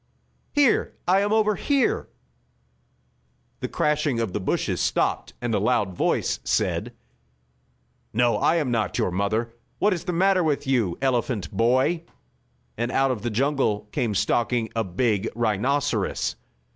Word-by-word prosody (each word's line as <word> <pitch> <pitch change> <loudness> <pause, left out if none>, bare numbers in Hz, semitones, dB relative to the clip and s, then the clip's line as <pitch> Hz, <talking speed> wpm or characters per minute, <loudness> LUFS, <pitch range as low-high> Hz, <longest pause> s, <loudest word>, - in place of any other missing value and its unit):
Here 290 -4 +3
I 185 +2 +4
am, 205 +1 0
over 215 -1 +3
here!" 285 - 0 1.5
The - - -3
crashing 150 -4 0
of 110 -5 -2
the - - -1
bushes 95 - -1
stopped, - - 0
and 120 -1 -2
a - - +2
loud 105 -3 +1
voice - - 0
said: - - 0 1.2
"No, 120 -1 +2
I 160 - +2
am 150 -7 0
not 110 -4 0
your - - 0
mother. 110 +5 -1 0.2
What 210 - +3
is 170 - -5
the 180 - -1
matter 185 +1 +3
with 150 -2 0
you, 120 -10 +1
elephant 120 -7 0
boy?" 130 +8 +2 0.8
and 120 +1 -1
out 135 0 +2
of 120 -5 -3
the 120 - -2
jungle 115 -4 0
came 120 -7 -1
stalking 115 +2 0
a 115 - +1
big 105 +2 0
rhinoceros. 120 +1 0
120 Hz, 145 wpm, -24 LUFS, 110-150 Hz, 1.5 s, I